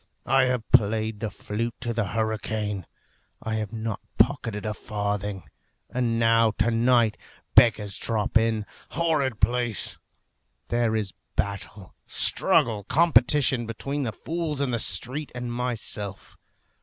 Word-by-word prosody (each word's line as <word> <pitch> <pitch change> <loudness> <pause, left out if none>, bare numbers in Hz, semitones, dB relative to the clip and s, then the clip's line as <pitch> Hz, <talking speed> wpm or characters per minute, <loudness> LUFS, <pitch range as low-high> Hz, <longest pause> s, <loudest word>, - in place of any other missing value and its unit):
I 135 0 +4
have 125 -3 0
played 110 0 +3
the 110 -1 -2
flute 105 +3 -4
to 120 - -2
the 115 -2 0
hurricane. 110 -2 -2 0.5
I 110 0 -3
have 105 -2 -3
not 110 -2 -4 0.2
pocketed 115 -4 +1
a 105 - -1
farthing; 105 -2 -3 0.5
and 120 -2 0
now, 115 -1 +4
to 115 - +2
night, 115 -1 +3 0.4
beggars 105 -4 +4
drop 110 -1 -1
in. 110 -1 +2 0.2
Horrid 145 -9 0
place! 120 -5 0 0.7
There 120 -2 +1
is 105 -3 -2 0.2
battle, 100 -1 -4
struggle, 110 -3 +2
competition 135 -5 +4
between 140 +6 -3
the 120 -5 -1
fools 160 +3 -3
in 140 -3 0
the 120 - 0
street 130 +10 0
and 120 -1 -4
myself. 110 -5 -4
115 Hz, 130 wpm, -26 LUFS, 105-125 Hz, 0.7 s, I